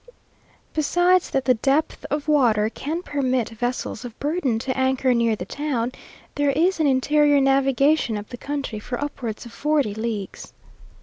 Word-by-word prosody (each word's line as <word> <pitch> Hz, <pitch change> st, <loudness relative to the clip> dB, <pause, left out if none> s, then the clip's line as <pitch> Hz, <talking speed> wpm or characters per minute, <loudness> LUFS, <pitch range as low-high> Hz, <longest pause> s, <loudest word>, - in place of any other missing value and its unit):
Besides 350 Hz, +4 st, +2 dB
that 270 Hz, -2 st, -1 dB
the 255 Hz, -, +5 dB
depth 270 Hz, +6 st, 0 dB
of 295 Hz, +1 st, -2 dB
water 230 Hz, -8 st, +3 dB
can 320 Hz, +9 st, -4 dB
permit 260 Hz, -6 st, -1 dB
vessels 245 Hz, 0 st, -3 dB
of 240 Hz, -3 st, -9 dB
burden 290 Hz, -6 st, 0 dB
to 260 Hz, +3 st, -3 dB
anchor 260 Hz, -1 st, +2 dB
near 230 Hz, -2 st, +2 dB
the 180 Hz, -, -6 dB
town, 255 Hz, -1 st, -2 dB, 0.4 s
there 290 Hz, 0 st, +1 dB
is 330 Hz, +6 st, +2 dB
an 310 Hz, -, +3 dB
interior 290 Hz, +2 st, +3 dB
navigation 270 Hz, -2 st, +2 dB
up 205 Hz, 0 st, -8 dB
the 245 Hz, -, -7 dB
country, 275 Hz, -5 st, -4 dB
for 245 Hz, +3 st, -5 dB
upwards 255 Hz, -6 st, -5 dB
of 235 Hz, -, -10 dB
forty 295 Hz, -8 st, 0 dB
leagues. 220 Hz, -2 st, -5 dB
265 Hz, 160 wpm, -23 LUFS, 235-290 Hz, 0.4 s, the